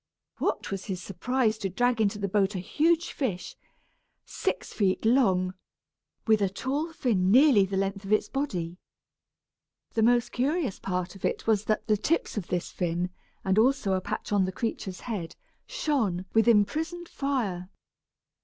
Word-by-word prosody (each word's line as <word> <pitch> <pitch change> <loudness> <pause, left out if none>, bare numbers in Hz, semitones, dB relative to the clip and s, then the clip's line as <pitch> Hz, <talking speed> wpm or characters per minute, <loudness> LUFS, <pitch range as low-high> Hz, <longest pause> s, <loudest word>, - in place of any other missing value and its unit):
What - - -1
was 195 -1 -4
his 190 -3 -3
surprise 220 +4 0
to 195 - -2
drag 245 +4 +1
into 205 -1 +1
the 200 -1 -2
boat 195 +1 +1
a - - -1
huge 325 - +1
fish, 205 -11 -3 0.7
six - - -3
feet 195 0 +1
long, 190 -7 +3 0.7
with 220 -2 +4
a 195 - +2
tall 275 - -2
fin 210 - +1
nearly 250 -3 +6
the 195 0 -2
length 195 +1 -1
of 195 - -6
its 215 - +3
body. 180 -12 -3 1.2
The 225 - +1
most 240 +1 +3
curious 275 - 0
part 180 -1 -3
of 195 - -14
it - - -1
was 215 -2 +2
that 215 - 0
the 215 -2 +2
tips 320 +11 0
of 205 -5 -3
this 175 -1 -2
fin, 175 0 -1 0.3
and 190 +2 +3
also 245 -4 +3
a 185 - 0
patch - - -5
on 200 -2 +3
the 185 - -2
creature's 190 -2 -4
head, 200 -9 -5 0.3
shone 210 - -1
with 225 +1 +4
imprisoned 315 - +2
fire. 220 - -2
210 Hz, 165 wpm, -28 LUFS, 190-250 Hz, 1.2 s, nearly